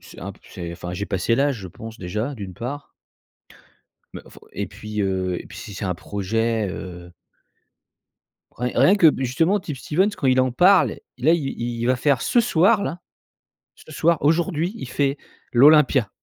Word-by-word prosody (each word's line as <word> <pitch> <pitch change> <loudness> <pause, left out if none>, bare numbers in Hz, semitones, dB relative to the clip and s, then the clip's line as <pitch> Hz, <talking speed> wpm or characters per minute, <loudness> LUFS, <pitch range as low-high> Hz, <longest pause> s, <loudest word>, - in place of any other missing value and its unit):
c'est - - -15
un - - -6
p - - -22
c'est 85 -1 -7
enfin 90 +1 -7
j'ai 100 +3 -4
passé 105 +5 0
l'âge 140 -1 +1
je 95 - -8
pense 110 +6 -10
déjà, 105 +10 -3
d'une 95 -5 -8
part. 135 +7 -6 1.2
Mais - - -8
faut - - -17
et - - -3
puis, 105 -1 -5
heu, 95 -2 -1
et - - -18
puis - - -12
si 100 - -8
c'est 100 - -5
un 90 -2 -1
projet, 110 +3 -1
heu 90 -2 -8 1.4
Rien 125 +1 -3
rien 200 - +6
que 170 -6 +6
justement 165 +10 +1
Tip 150 -6 -6
Stevens, 185 +10 +1
quand 135 - -1
il 130 0 +4
en 130 -1 0
parle, 180 +7 +4 0.2
là, 145 +6 +3
il 145 -7 -2
il 120 0 -3
va 130 - +3
faire 135 -1 +1
ce 240 - +2
soir, 200 0 +3
là, 165 +6 -4 0.8
ce 155 - -16
soir, 165 +1 +2
aujourd'hui, 165 +4 +1
il 210 - -7
fait 140 +1 0 0.4
l'Olympia. 135 -3 +5
125 Hz, 180 wpm, -22 LUFS, 100-155 Hz, 1.4 s, rien